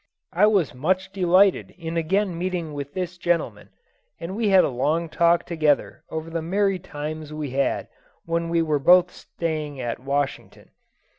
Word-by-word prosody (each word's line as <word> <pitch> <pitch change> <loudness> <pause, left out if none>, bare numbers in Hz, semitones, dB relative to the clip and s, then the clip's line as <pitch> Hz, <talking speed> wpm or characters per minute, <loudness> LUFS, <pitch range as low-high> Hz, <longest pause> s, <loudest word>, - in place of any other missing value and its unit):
I 195 +5 +5
was 195 -9 +2
much 185 +8 -1
delighted 190 +1 +3
in 165 -1 -5
again 180 +3 0
meeting 175 -3 -3
with 140 -1 -6
this 180 -1 -4
gentleman, 175 -1 -1 0.5
and 175 +3 -5
we 220 -1 +1
had 190 -2 +6
a - - +1
long 155 +6 0
talk 170 +1 +2
together 155 -4 0
over 160 +1 -5
the 165 0 -2
merry 195 +3 0
times 155 -2 -6
we 150 -3 -5
had 140 +1 0 0.4
when 170 0 -1
we 170 0 +2
were 155 -2 0
both 180 +4 +5
slaying 155 -4 -4
at 120 -2 -3
Washington. 140 +1 -3
165 Hz, 160 wpm, -24 LUFS, 150-185 Hz, 0.5 s, had